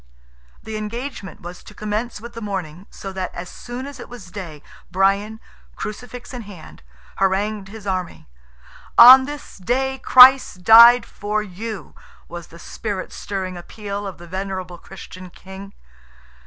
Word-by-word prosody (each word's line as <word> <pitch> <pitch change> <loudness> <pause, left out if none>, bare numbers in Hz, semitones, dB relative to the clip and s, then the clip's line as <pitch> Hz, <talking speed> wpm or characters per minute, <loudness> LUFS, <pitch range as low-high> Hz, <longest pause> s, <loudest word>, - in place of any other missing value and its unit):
The 220 -1 -6
engagement 230 -1 -7
was 175 +1 -9
to 210 - -14
commence 215 +3 -4
with 235 +2 -10
the 230 - -8
morning, 190 -4 -6
so 195 -1 -9
that, 190 -1 -4
as 175 +1 -7
soon 245 +2 -8
as 280 -1 -10
it - - -10
was 220 -8 -12
day, 170 -7 -9 0.3
Brian, 200 +3 0 0.4
Crucifix 245 +4 -8
in 250 - -6
hand, 195 -7 -13 0.4
harangued 195 +1 0
his 210 +1 -11
army. 185 - -4 0.7
"On 260 +2 +10
this 290 -6 -9
day 265 +7 -1
Christ 255 -8 +6
died 235 +3 +8
for 210 +1 -3
you!" 210 +1 -8 0.3
was 175 0 -9
the 170 - -15
spirit 200 +2 -6
stirring 190 -2 -5
appeal 200 +2 -7
of 190 - -8
the 175 - -12
venerable 185 -1 -6
Christian 185 -1 -11
King. 190 +2 -12
205 Hz, 145 wpm, -21 LUFS, 185-235 Hz, 0.7 s, On